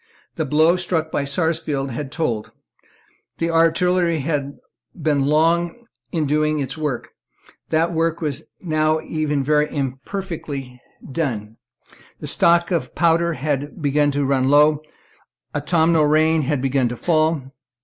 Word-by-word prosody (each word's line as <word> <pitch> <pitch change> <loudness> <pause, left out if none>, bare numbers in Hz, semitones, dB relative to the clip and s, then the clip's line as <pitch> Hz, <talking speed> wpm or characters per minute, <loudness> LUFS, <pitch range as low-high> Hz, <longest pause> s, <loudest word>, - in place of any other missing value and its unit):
The 160 - -1
blow 155 +5 +3
struck 165 -3 -2
by 140 - -1
Sarsfield 145 -2 -1
had 135 +3 -5
told; 120 -10 -2 0.9
the 165 0 -1
artillery 170 +1 +2
had 140 -1 -2 0.4
been 145 -3 +1
long 170 +8 +1 0.3
in 160 -3 0
doing 155 +1 +1
its 135 -2 -2
work; 150 -6 -3 0.6
that 165 +2 +1
work 165 0 0
was 150 -2 -3 0.2
even - - -7
now 155 0 +2 0.4
very 150 +1 +2
imperfectly 140 -2 -5 0.3
done; 115 -8 -3 0.6
the - - -7
stock 170 +1 +3
of 170 - -2
powder 170 0 +2
had 145 +2 -3
begun 145 -1 +2
to 145 0 0
run 135 -1 +2
low; 150 +1 +5 0.7
the - - 0
autumnal 160 0 +3
rain 155 +1 +3
had 140 -1 -1
begun 135 -2 +1
to 120 - -5
fall. 155 -4 0
155 Hz, 135 wpm, -21 LUFS, 140-165 Hz, 0.9 s, low